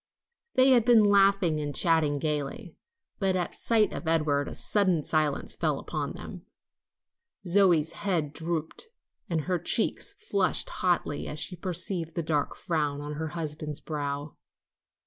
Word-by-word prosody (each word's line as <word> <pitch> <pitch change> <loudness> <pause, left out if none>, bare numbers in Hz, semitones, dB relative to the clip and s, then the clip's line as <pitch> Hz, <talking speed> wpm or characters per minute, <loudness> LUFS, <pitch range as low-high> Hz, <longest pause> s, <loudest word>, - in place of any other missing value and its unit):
They 260 +1 +6
had 245 -3 +5
been 235 -2 +6
laughing 195 -5 +3
and 145 -2 -4
chatting 160 -4 +3
gayly, 155 - -3 0.4
but 190 -3 +1
at 180 -2 -2
sight 220 -2 +1
of 170 - -6
Edward 150 -3 +1
a - - -6
sudden 185 -7 +1
silence 155 -2 0
fell - - -2
on - - -3
them. - - -10 1.0
Zoe's 175 -4 +4
head 170 -7 -2
drooped 165 - -4 0.4
and 165 -2 0
her 180 +3 -1
cheeks 195 +6 +1
flushed 195 -3 0
hotly 175 -5 0
as 150 - -5
she 180 +4 0
perceived 175 -1 -2
the 170 - -1
dark 150 -2 -1
frown 150 -4 -2
on 145 +1 -6
her 160 +2 -4
husband's 150 -2 -5
brow. 145 -1 -5
165 Hz, 145 wpm, -27 LUFS, 150-190 Hz, 1.0 s, They